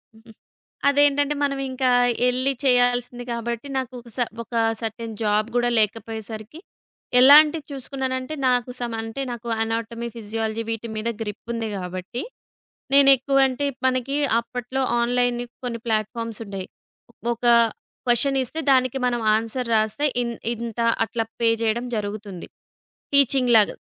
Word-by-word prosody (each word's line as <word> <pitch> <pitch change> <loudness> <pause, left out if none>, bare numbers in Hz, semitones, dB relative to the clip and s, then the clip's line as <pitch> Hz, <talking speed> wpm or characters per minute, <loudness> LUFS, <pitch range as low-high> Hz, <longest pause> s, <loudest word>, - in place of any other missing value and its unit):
హుహు. 225 +1 -17 0.6
అదేంటంటే 290 +1 +3
మనం 275 -1 0
ఇంకా 260 0 0 0.4
ఏళ్లి 255 +2 +1
చేయాల్సింది 245 -1 +2
కాబట్టి, 235 +2 -4
నాకొక 250 -2 -5
స - - -5 0.2
ఒక 235 - -18 0.3
సెర్‌టైన్ 225 0 -5
జాబ్ 210 0 +2
కూడా 240 0 +2
లేకపోయేసరికి, 220 +3 -3 0.6
ఎలాంటిది 295 +3 +7
చూసుకున్నానంటే 265 0 -4
నాకు 250 0 +1
సమ్ 240 -2 -3
అంటే, 225 +4 -5
నాకు 240 0 -7 0.2
అనాటమీ, 230 +1 -3
ఫిజియాలజీ 225 0 -3
వీటి 225 +1 -4
మీద 220 +2 -2
గ్రిప్ 210 -1 -5
ఉంది 225 -1 -3
కాబట్టి, 185 +5 -5 0.7
నేనెక్కువంటే 275 0 +4 0.2
మనకి 255 +2 0 0.2
అప్పట్లో 245 +2 -3 0.2
ఆన్‌లైన్ 245 0 +1 0.2
కొన్ని 235 -2 -4
ప్లాట్‌ఫామ్సుండేయి. 215 -3 -3 0.7
ఒక 235 +1 -8 0.6
క్వెషన్ 270 +3 +3
ఇస్తే 285 +6 -5
దానికి 255 0 +3
మనం 240 -1 -1
ఆన్సర్ 230 +3 -2
రాస్తే, 220 +7 +1 0.2
ఇన్ 235 -1 -4 0.2
ఇంత 230 0 -6 0.3
అట్లా 225 0 -2 0.2
పే 230 - +4
చేయడం 225 +2 0
జరుగుతుంది. 205 -3 -5 0.7
టీచింగ్ 265 -3 +4
లాగా. 210 - +3
240 Hz, 120 wpm, -23 LUFS, 225-260 Hz, 0.7 s, ఎలాంటిది